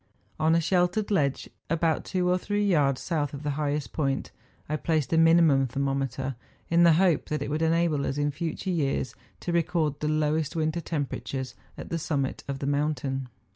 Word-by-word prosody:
On 160 +1 +3
a - - +4
sheltered 180 +5 +1
ledge, 140 -8 +1 0.2
about 165 0 +1
two 180 -2 0
or 180 +1 +2
three 205 +2 -1
yards 145 -9 +3
south 150 -4 -1
of 140 - -8
the 145 - -1
highest 145 0 -2
point, 135 -3 -1 0.4
I 150 - -1
placed 155 -1 0
a - - +4
minimum 165 -5 +5
thermometer, 135 0 -2 0.4
in 170 0 +5
the 170 -1 +7
hope 175 -1 +2
that 150 - -1
it - - -4
would 155 +2 -1
enable 160 -3 +2
us 135 - -2
in 145 0 +1
future 170 +5 -3
years 140 -7 -1 0.3
to 175 - -3
record 165 -4 +1
the 150 - -1
lowest 155 +1 0
winter 160 +1 0
temperatures 135 -4 -4 0.2
at - - -8
the 165 - -2
summit 140 -4 -2
of 140 -1 -3
the 135 - -4
mountain. 140 -2 -1
155 Hz, 185 wpm, -27 LUFS, 140-170 Hz, 0.4 s, the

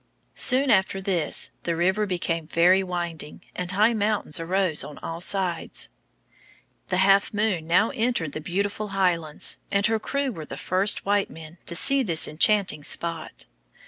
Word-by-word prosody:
Soon 265 +1 +4
after 190 -1 +2
this 185 -4 0
the 170 - -2
river 190 +5 +1
became 170 -3 -2
very 180 +4 +4
winding, 175 -4 -5
and 180 0 -3
high 215 +5 +3
mountains 210 -7 0
arose 175 -1 0
on 150 - -9
all 165 +1 -6
sides. 185 -3 -2 1.0
The 185 - -1
Half 195 +2 +3
Moon 205 -7 0
now 185 +6 +3
entered 235 - -1
the 155 - -5
beautiful 200 +5 -2
Highlands, 170 -5 0
and 200 +1 +2
her 225 -1 +2
crew 280 +4 -2
were 160 -8 -8
the - - -8
first 190 +3 +2
white 205 0 +1
men 165 +1 -12
to 170 - -1
see 275 +9 +5
this 170 -10 +1
enchanting 185 0 +1
spot. 165 +1 -3
185 Hz, 155 wpm, -25 LUFS, 165-205 Hz, 1.0 s, see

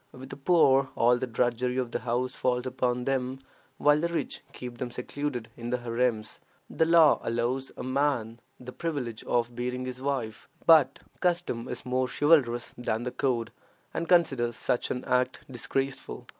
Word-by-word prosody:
With 130 +1 -11
the - - -5
poor 135 -3 +4
all 120 +1 +4
the 130 - -2
drudgery 125 +1 0
of 125 -2 -1
the - - -1
house 125 +2 -1
falls 125 0 0
upon 125 -1 -1
them, 130 -1 -1 0.4
while 150 +1 +4
the 170 - +1
rich 170 0 -3
keep 125 -1 -8
them 125 - -3
secluded 125 0 -4
in 120 0 -6
the 125 - +1
harems. 120 -2 -1 0.3
The 160 - +2
law 165 -2 +6
allows 120 +3 -1
a - - -5
man 130 -4 0 0.2
the 125 0 -8
privilege 135 -8 -4
of 120 0 0
beating 125 +1 -3
his 130 0 -6
wife, 130 -6 -3 0.2
but 155 -5 +6 0.2
custom 175 -10 0
is 125 +1 -6
more 130 0 0
chivalrous 130 -6 +2
than 115 -1 -1
the 125 - -3
code, 120 -5 -1 0.4
and 170 0 -3
considers 135 -10 +3
such 125 - 0
an 125 - -3
act 125 0 0
disgraceful. 135 +2 -3
125 Hz, 170 wpm, -28 LUFS, 120-135 Hz, 0.4 s, law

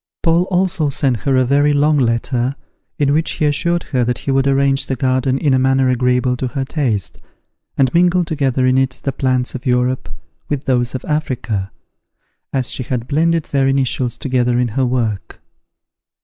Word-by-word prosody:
Paul 170 +2 +3
also 180 -4 +1
sent 135 -2 0
her 135 +3 0
a 130 0 +3
very 145 +3 +3
long 145 +1 +3
letter, 120 +2 0 0.4
in 145 -1 +2
which 155 +1 0
he 155 - -1
assured 170 +4 +1
her 125 -2 +2
that 125 0 -1
he 140 - -3
would 135 0 +2
arrange 135 0 +2
the 135 - -1
garden 130 +1 0
in 140 0 +1
a 130 - +3
manner 130 0 +2
agreeable 125 0 +1
to 130 - -2
her 135 +1 -3
taste, 125 - -2 0.6
and 130 -2 +2
mingle 175 +1 +3
together 135 -5 0
in 130 +1 +3
it 130 -1 0
the 135 - -1
plants 130 -2 -1
of 130 +1 -6
Europe 125 +1 0 0.4
with 145 -2 -2
those 125 -1 0
of 130 - -5
Africa, 125 -10 -2 0.8
as 130 -2 -1
she - - -2
had 125 -1 -3
blended 165 +2 +1
their 135 -1 +2
initials 130 -3 0
together 125 -2 0
in 125 -1 +1
her 130 +3 0
work. 115 -6 -2
130 Hz, 180 wpm, -17 LUFS, 125-145 Hz, 0.8 s, Paul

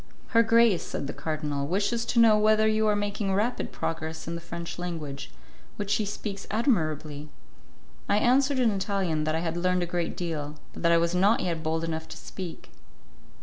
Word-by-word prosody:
"Her 230 - +5
grace," 230 -4 +4
said - - -4
the 145 - -4
Cardinal, 150 -3 -2
"wishes 205 +7 0
to 240 - +1
know 225 -2 +7
whether 215 +1 +4
you 215 0 +2
are 210 - +3
making 205 -1 -1
rapid 225 +5 -1
progress 160 -1 -4
in 165 - -3
the 170 - -5
French 170 +1 -6
language, 155 -6 -5 0.5
which 205 -1 -3
she 210 +1 +2
speaks 200 -1 -5
admirably." 155 - 0 0.8
I 205 - +4
answered 265 +5 +3
in 245 -3 +3
Italian 190 -6 -1
that 155 0 0
I 160 - 0
had 165 -1 -2
learned 180 0 +1
a - - 0
great 175 -1 -2
deal, 155 -4 -3 0.2
but - - -9
that 170 - +4
I 170 - +6
was 170 +1 +1
not 200 +7 +3
yet 170 -3 -2
bold 160 +1 -1
enough 160 -1 -3
to - - -9
speak. 180 -4 -8
180 Hz, 190 wpm, -27 LUFS, 160-215 Hz, 0.8 s, know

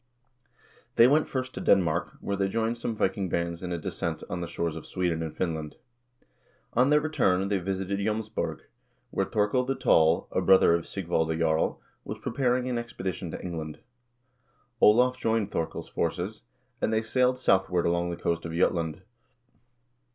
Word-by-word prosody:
They 115 - +7
went 150 +4 +3
first 130 -1 -3
to - - -5
Denmark, 85 -5 +2
where 100 - -2
they 95 0 +1
joined 115 +3 0
some 115 -1 -3
Viking 95 -2 0
bands 85 0 -2
in 90 -1 -4
a 85 - -1
descent 80 - -4
on 90 0 -3
the 85 - -3
shores 85 -1 -2
of - - -8
Sweden 85 -3 -1
and 80 -1 -5
Finland. 80 -4 -3 1.0
On 125 +3 +4
their 150 0 +5
return 100 -11 +1
they 100 -2 +1
visited 95 +2 -2
J 100 - -1
6ms 110 0 -2
borg, 80 -6 -3 0.5
where - - 0
Thorkel 105 +4 +1
the 135 +1 -1
Tall, 80 -6 +3
a - - 0
brother 95 -3 +6
of 85 -1 -1
Sigvalde 80 -4 -1
Jarl, 80 -1 +1 0.2
was - - -6
pre - - -5
paring 125 -1 +1
an 125 -2 -1
expedition 95 -6 -5
to - - -6
England. 80 -4 -5 1.0
Olav 125 +4 +5
joined 110 -3 0
Thorkel's 80 - -3
forces, 90 +6 -2 0.4
and - - +1
they 110 0 +1
sailed 125 +3 +2
southward 95 -6 +2
along 85 0 +1
the 85 - -4
coast 85 0 -1
of 85 - -5
Jutland. 85 0 0
95 Hz, 175 wpm, -27 LUFS, 85-115 Hz, 1.0 s, They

